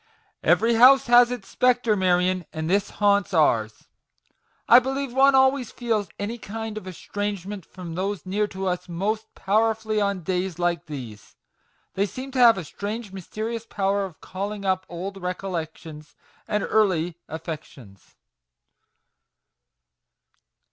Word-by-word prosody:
" - - -41
Every 230 +1 +3
house 260 +4 +7
has 240 0 +6
its 245 -6 -6
spectre, 245 -3 +2
Marion, 185 -2 +1
and 160 0 -4
this 200 +3 +1
haunts 200 -2 +1
ours. 110 -9 +1 0.8
I 240 - +9
believe 270 0 -3
one 270 +1 +5
always 265 -2 +3
feels 220 -6 -1
any 225 +4 -4
kind 220 +1 -6
of 215 -3 -7
estrangement 200 0 -5
from 180 -3 -9
those 195 +3 -3
near 205 +3 0
to 190 -1 -6
us 180 0 -2
most 210 +6 -2
powerfully 220 +1 +1
on 200 -3 -1
days 180 0 -2
like 175 -3 -1
these. 120 -9 -9 0.6
They 200 +2 0
seem 260 +5 -7
to 260 - -2
have 235 -4 +7
a 190 - -4
strange 205 +4 -6
mysterious 220 +5 -5
power 200 0 0
of 185 -5 -8
calling 200 +2 -5
up 185 0 0
old 190 +3 -6
recollections 165 -4 -6 0.3
and 210 -1 0
early 180 -6 +1
affections 150 - -9
200 Hz, 135 wpm, -24 LUFS, 180-225 Hz, 0.8 s, I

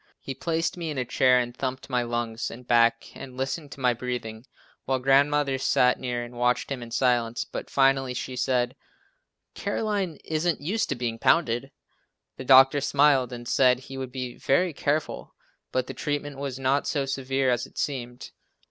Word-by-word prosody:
He 135 - -6
placed 165 +4 -2
me 170 -2 -4
in 150 - -4
a 125 - -1
chair 125 +1 +4
and 120 -1 -1
thumped 130 0 -4
my 125 -2 0
lungs 120 -1 -3
and 125 +2 -11
back 115 -1 +2
and 130 -2 -10
listened 140 +3 -3
to - - -14
my 125 -2 +3
breathing 120 -1 -5 0.4
while 135 0 +1
Grandmother 135 +1 +2
sat 125 -1 +3
near 120 -2 -3
and 120 +1 -10
watched 125 +2 +1
him 135 -3 -3
in 120 - -8
silence, 120 -1 +1
but - - -7
finally 135 -2 +2
she 130 - -4
said, 125 0 0 0.8
"Caroline 200 -7 -2
isn't 160 +2 0
used 205 +10 -1
to - - -1
being 120 -2 -3
pounded!" 135 -4 +2 0.7
The 130 - -7
doctor 135 +2 +7
smiled 140 -3 +3
and 120 -1 -7
said 125 -1 +4
he 135 +1 -10
would 130 -1 -5
be 125 -2 -5
very 175 +5 +1
careful, 145 +2 -2 0.4
but 130 -1 0
the - - -7
treatment 145 -1 -3
was 140 -2 -4
not 135 +1 +1
so 140 -3 0
severe 135 -1 0
as 120 - -1
it - - -22
seemed. 125 -3 -4
130 Hz, 180 wpm, -26 LUFS, 125-140 Hz, 0.8 s, doctor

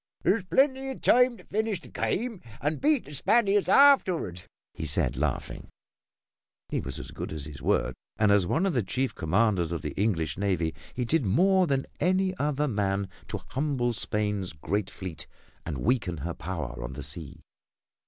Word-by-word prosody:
"There's 190 +3 +2
plenty 265 +5 +2
of 265 - -6
time 250 -1 +5
to - - -15
finish 215 -1 -1
the - - -12
game 230 -2 -2 0.2
and 150 +3 -1
beat 295 -2 +3
the 145 - -10
Spaniards 205 - +3
afterward," 185 - +5 0.3
he - - -6
said, 75 - +1
laughing. - - -3 1.0
He - - -1
was 65 0 -4
as - - -7
good - - -6
as 75 -3 -5
his 75 -3 -9
word, - - +1 0.2
and 105 -2 +4
as 100 -3 +4
one 165 - +1
of 195 - +1
the 125 - +2
chief 125 +7 -1
commanders 90 0 +1
of 85 - -3
the 75 - -3
English 85 -5 -1
navy, 90 -5 0 0.2
he 125 - -1
did 155 +4 +2
more 180 - +4
than 135 -2 0
any 185 +1 +2
other 150 0 +1
man 100 -4 0 0.2
to - - -4
humble 130 -4 0
Spain's 105 -3 -1
great 95 +6 -2
fleet 90 -4 -7 0.4
and 75 - -3
weaken 110 -8 +1
her 85 +4 -4
power 75 -10 -5
on - - -5
the - - -6
sea. 75 -5 -5
115 Hz, 175 wpm, -28 LUFS, -, 1.0 s, time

